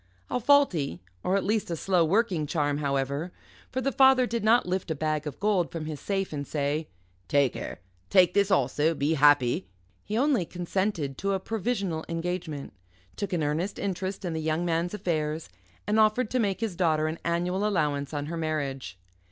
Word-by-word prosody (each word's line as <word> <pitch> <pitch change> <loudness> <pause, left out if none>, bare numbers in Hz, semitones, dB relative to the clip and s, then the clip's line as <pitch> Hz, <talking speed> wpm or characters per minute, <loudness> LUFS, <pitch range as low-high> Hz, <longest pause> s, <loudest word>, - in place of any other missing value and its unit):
A - - +1
faulty, 215 - +3 0.2
or 190 - +2
at 195 - -1
least 215 0 0
a 170 - -1
slow 180 +1 +2
working, 180 -3 +1
charm, 145 -2 0
however, 140 +3 -1 0.4
for 260 - -2
the 275 +2 0
father 265 -2 +5
did 235 -2 -2
not 230 +3 +4
lift 185 0 -2
a 160 - -1
bag 155 0 -1
of 145 - -7
gold 200 -4 +1
from 165 -2 -5
his 155 -2 -5
safe 195 -4 -2
and 140 -2 -4
say: 150 +1 -1 0.4
"Take 140 +2 +3
her, - - -6 0.3
take 180 -2 +5
this 200 -1 +3
also 155 -1 +2
be 145 +2 +1
happy" 140 -9 +4 0.4
he 215 +2 -3
only 265 -6 +3
consented 175 -5 -2
to 195 +1 0
a 190 - 0
provisional 200 -6 -2
engagement, 165 -5 -4 0.4
took 200 - -4
an 170 -4 0
earnest 160 +7 -1
interest 190 0 -3
in 170 - -2
the 160 - -2
young 160 +2 0
man's 170 +3 0
affairs, 155 - -2 0.4
and 215 +1 +2
offered 215 +2 +3
to 255 - +1
make 200 -3 0
his 220 -6 -2
daughter 160 -3 +2
an 160 +1 -3
annual 175 +3 0
allowance 150 -9 0
on 145 -1 -3
her 165 +3 -4
marriage. 140 - -3
170 Hz, 185 wpm, -27 LUFS, 150-200 Hz, 0.4 s, father